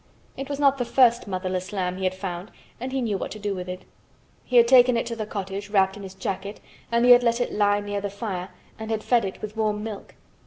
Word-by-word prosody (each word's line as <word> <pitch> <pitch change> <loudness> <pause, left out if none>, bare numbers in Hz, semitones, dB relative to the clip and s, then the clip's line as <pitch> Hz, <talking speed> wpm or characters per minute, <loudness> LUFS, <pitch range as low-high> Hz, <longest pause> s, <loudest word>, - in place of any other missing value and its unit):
It 270 +1 -6
was 285 -1 -3
not 275 -1 +3
the - - +1
first 240 -2 +3
motherless 185 0 -3
lamb 185 -2 -2
he 190 - -3
had 185 0 0
found 185 0 -5 0.3
and 255 +2 -4
he 265 -1 -1
knew 210 -4 -1
what - - -4
to - - -8
do 205 -1 -2
with 180 -1 -6
it. 185 0 -7 0.6
He 250 - -4
had 235 0 +7
taken 250 -1 +6
it 230 - -1
to 230 0 -4
the 215 -2 -4
cottage 200 0 -5
wrapped 195 -2 +2
in 205 - -9
his 190 -1 -9
jacket 195 +2 -4 0.3
and 235 +1 +3
he 250 - +7
had 245 0 +9
let 235 0 +1
it 245 - -1
lie 205 0 +2
near 205 0 -3
the 200 - -3
fire 195 -3 -5 0.3
and 220 0 -6
had 220 -1 -2
fed 235 -4 +2
it 190 - -7
with 215 0 -6
warm 210 -1 -1
milk. 215 -2 -7
210 Hz, 260 wpm, -25 LUFS, 190-235 Hz, 0.6 s, had